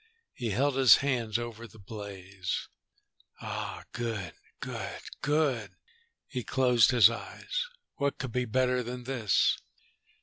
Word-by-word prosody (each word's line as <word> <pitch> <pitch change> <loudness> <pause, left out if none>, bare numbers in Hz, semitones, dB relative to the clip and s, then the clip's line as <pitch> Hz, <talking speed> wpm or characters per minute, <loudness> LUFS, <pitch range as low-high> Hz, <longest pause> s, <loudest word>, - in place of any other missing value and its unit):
He 120 -2 -3
held 135 +6 +1
his 130 -5 +9
hands 120 -5 +1
over 115 -1 -6
the 110 - -17
blaze. 100 -3 -5 0.7
"Ah, - - -5
good, 110 -8 -3 0.3
good. - - -5 0.2
Good." 135 - +1 0.5
He 125 - -4
closed 125 -1 +4
his 120 -5 +8
eyes. - - -4 0.3
"What 140 0 0
could 130 - -4
be 125 +1 0
better 125 +2 +2
than 125 +1 -5
this?" 120 -6 +2
120 Hz, 125 wpm, -30 LUFS, 110-130 Hz, 0.7 s, his